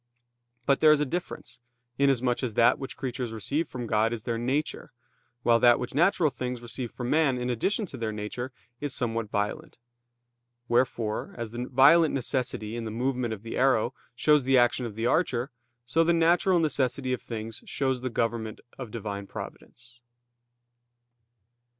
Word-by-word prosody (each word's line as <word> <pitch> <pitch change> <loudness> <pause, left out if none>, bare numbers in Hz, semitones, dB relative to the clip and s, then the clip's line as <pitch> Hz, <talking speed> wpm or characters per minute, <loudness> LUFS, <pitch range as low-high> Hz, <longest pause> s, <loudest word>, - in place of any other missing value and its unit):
But 140 +1 +3
there 155 - +7
is 150 - +5
a 150 - +1
difference, 130 -5 -5 0.4
inasmuch 130 -3 +2
as 120 -5 -3
that 115 - +4
which 135 - -7
creatures 125 -2 -4
receive 120 - -2
from 125 -1 -6
God 110 0 +2
is 115 -2 -5
their 115 -1 -2
nature, 135 +6 -2 0.5
while 115 -1 +4
that 120 -1 +6
which 125 - -5
natural 170 0 +3
things 125 -1 -4
receive 120 +1 -5
from 125 +1 -5
man 150 -4 +3
in 125 0 -1
addition 200 - 0
to 140 - -9
their 115 -2 -2
nature 105 +4 -5 0.3
is 145 -2 -3
somewhat 115 -3 -2
violent. 105 +1 -3 0.9
Wherefore, 120 -3 0
as 115 -2 -5
the 120 +1 -4
violent 150 +5 +6
necessity 125 -4 -2
in 115 -1 -4
the - - -3
movement 125 +1 -1
of 110 -1 -6
the 115 - -6
arrow 130 -2 +2 0.2
shows 150 +2 +4
the 135 +1 +4
action 120 0 +3
of 105 - -9
the 115 +1 -2
archer, 130 -2 +1 0.3
so 160 +7 +2
the 170 +1 +3
natural 175 +2 +3
necessity 135 -5 0
of 125 - -3
things 115 -1 -6
shows 130 -2 -1
the 130 - -2
government 115 -2 -2 0.2
of 125 -4 -6
Divine 100 -3 -5
Providence. 120 +4 -10
125 Hz, 170 wpm, -27 LUFS, 115-135 Hz, 0.9 s, there